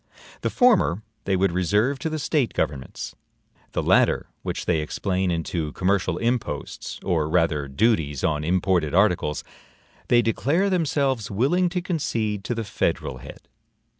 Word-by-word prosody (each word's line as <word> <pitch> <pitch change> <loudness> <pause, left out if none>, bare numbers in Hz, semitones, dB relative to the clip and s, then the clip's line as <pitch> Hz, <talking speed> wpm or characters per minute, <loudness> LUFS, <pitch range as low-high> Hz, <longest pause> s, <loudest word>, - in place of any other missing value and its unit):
The - - 0
former 210 - +3 0.2
they 95 - +1
would 95 0 +2
reserve 105 +10 +1
to 160 - -2
the 155 - -3
State 145 -4 0
governments; 70 -2 -3 0.6
the - - -1
latter, - - +3 0.2
which - - -4
they 85 -3 +2
explain 95 +4 -1
into 80 -2 -2
commercial 90 -2 +1
imposts, 115 - -3
or 80 -5 0
rather 80 -4 +1
duties 75 - +1
on 75 -1 +1
imported 85 -2 +1
articles, 90 -7 +2 0.6
they 120 -1 +4
declare 160 - +1
themselves 140 - 0
willing 145 - +2
to 180 0 -3
concede 115 - -1
to 120 - -1
the 115 - -2
federal 70 -9 -2
head. - - -12
100 Hz, 140 wpm, -24 LUFS, 80-130 Hz, 0.6 s, they